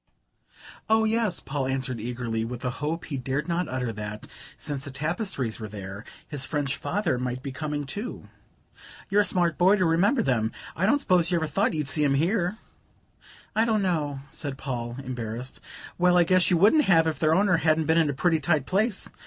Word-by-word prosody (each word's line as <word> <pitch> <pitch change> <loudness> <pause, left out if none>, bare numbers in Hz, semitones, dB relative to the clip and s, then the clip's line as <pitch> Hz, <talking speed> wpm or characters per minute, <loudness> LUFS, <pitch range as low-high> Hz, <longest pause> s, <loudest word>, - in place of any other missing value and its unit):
"Oh, 220 0 +4
yes," 220 -4 +1
Paul 135 -1 -3
answered 130 -2 -2
eagerly, 115 -1 -3
with 120 +2 -5
a 125 - 0
hope 160 +3 -2
he 140 - -4
dared 135 +4 -2
not 175 0 -1
utter 125 -2 -2
that, 105 0 -6 0.3
since 140 -2 -4
the 140 - -6
tapestries 150 - -2
were 110 - -5
there, 100 0 -8 0.2
his 145 -3 -4
French 145 -3 -1
father 180 -10 -1
might 125 0 -3
be 140 - -4
coming 150 +1 -3
too. 205 - -5 0.8
"You're 205 +1 +5
a - - +3
smart 175 -5 +1
boy 185 +3 +6
to 185 -3 +1
remember 200 +10 +3
them. 115 - 0 0.2
I 185 +4 +1
don't 280 - +4
suppose 180 - +2
you 175 - +2
ever 160 - 0
thought 150 +1 0
you'd 150 -3 -2
see 150 +1 -1
them 140 -2 +3
here?" 180 +5 +1 1.0
"I 220 - +4
don't 220 -3 +1
know," 150 -7 -1
said 140 -1 -6
Paul, 120 -3 -4
embarrassed. 125 0 -5 0.4
"Well, 180 0 +5
I 175 - +6
guess 185 +1 +3
you 175 - +4
wouldn't 220 - +5
have 165 -4 +5
if 155 -3 -1
their 155 0 +3
owner 190 -2 +4
hadn't 160 0 +2
been 160 +2 +3
in 160 -3 +3
a - - 0
pretty 165 +2 +2
tight 150 -2 +1
place. 200 - 0
155 Hz, 200 wpm, -26 LUFS, 130-180 Hz, 1.0 s, boy